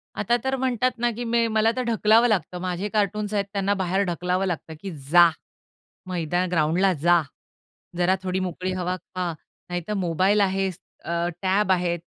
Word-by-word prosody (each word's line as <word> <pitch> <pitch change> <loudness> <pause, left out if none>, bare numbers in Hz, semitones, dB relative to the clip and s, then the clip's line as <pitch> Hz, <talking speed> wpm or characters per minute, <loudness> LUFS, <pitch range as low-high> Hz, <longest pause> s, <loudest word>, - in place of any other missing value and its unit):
आता 240 - +1
तर 265 0 0
म्हणतात 255 -1 0
ना, 240 +1 +1
की 240 +2 -5
मे 230 0 +1
मला 220 0 +2
तर 255 - -1
ढकलावं 230 0 +4
लागतं, 180 -4 -1
माझे 185 +3 -3
कार्टून्स 210 0 0
आहेत 200 -1 +1
त्यांना 200 0 +1
बाहेर 190 +2 +1
ढकलावं 180 +2 -1
लागतं, 165 -3 -4
की 195 -2 -5 0.2
जा. 175 -1 +8 0.8
मैदान, 175 0 -1
ग्राउंडला 175 +3 +2
जा. 175 -1 +5 0.8
जरा 180 +2 +3
थोडी 185 0 -1
मोकळी 185 +1 -4
हवा 180 0 -2
खा. 180 0 -4 0.4
नाहीतर 175 +3 -3
मोबाईल 190 +5 +2
आहेच, 190 -2 0 0.3
अ, 170 +1 -1
टॅब 190 +1 +2
आहे, 175 -1 +1
190 Hz, 165 wpm, -24 LUFS, 175-210 Hz, 0.8 s, जा